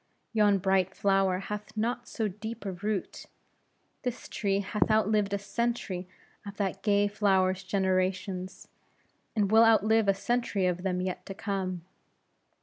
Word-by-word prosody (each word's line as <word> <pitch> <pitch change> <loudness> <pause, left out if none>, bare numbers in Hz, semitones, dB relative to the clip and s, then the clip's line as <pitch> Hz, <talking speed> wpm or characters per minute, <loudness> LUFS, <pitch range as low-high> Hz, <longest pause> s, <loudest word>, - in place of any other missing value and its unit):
Yon 210 -2 +4
bright 190 0 +1
flower 195 -2 +2
hath 210 +3 -6
not 240 +3 -1
so 220 - -2
deep 220 +3 -7
a 195 - -2
root. 205 +2 -4 0.7
This 250 -1 -4
tree 200 -1 0
hath 210 +3 0
outlived 215 -1 +2
a 200 - +1
century 200 -3 -2 0.4
of 200 0 -9
that 195 -1 -2
gay 205 -1 +3
flower's 190 -3 +2
generations, 185 -1 -1 0.7
and 205 -2 +1
will 225 +1 +7
outlive 220 -1 +4
a 195 - +4
century 230 -2 0
of 180 -1 0
them 180 -1 -1
yet 185 0 -3
to 195 - -6
come. 190 -4 -3
200 Hz, 145 wpm, -29 LUFS, 190-215 Hz, 0.7 s, will